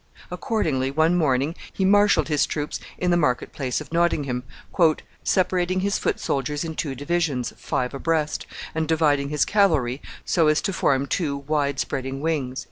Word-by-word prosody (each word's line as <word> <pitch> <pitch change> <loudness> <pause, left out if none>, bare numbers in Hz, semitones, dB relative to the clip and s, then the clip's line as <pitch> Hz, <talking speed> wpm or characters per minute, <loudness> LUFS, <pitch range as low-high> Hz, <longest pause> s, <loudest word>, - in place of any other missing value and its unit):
Accordingly, 150 - -1
one 160 +4 +2
morning, 145 -2 +1 0.2
he 190 - -1
marshaled 200 -5 +4
his 150 -2 +2
troops 150 -1 -3 0.2
in 180 0 0
the 175 - +4
market 125 -4 0
place 130 -4 -2
of 155 +1 -10
Nottingham, 145 -7 +1 0.8
"separating 185 0 +1
his 200 0 0
foot - - -1
soldiers 145 +2 -1
in 165 -1 -4
two 145 -3 -3
divisions, 145 -3 -1
five 125 +1 -2
abreast, 155 +2 -1 0.3
and 160 0 -1
dividing 150 -3 +2
his 150 -1 +1
cavalry 155 - +2 0.2
so 165 -3 +3
as 155 0 +4
to 195 - -1
form 135 -5 +2
two 145 -2 -1
wide 140 -1 -1
spreading 135 0 -3
wings." 140 -5 -1
150 Hz, 160 wpm, -24 LUFS, 135-170 Hz, 0.8 s, marshaled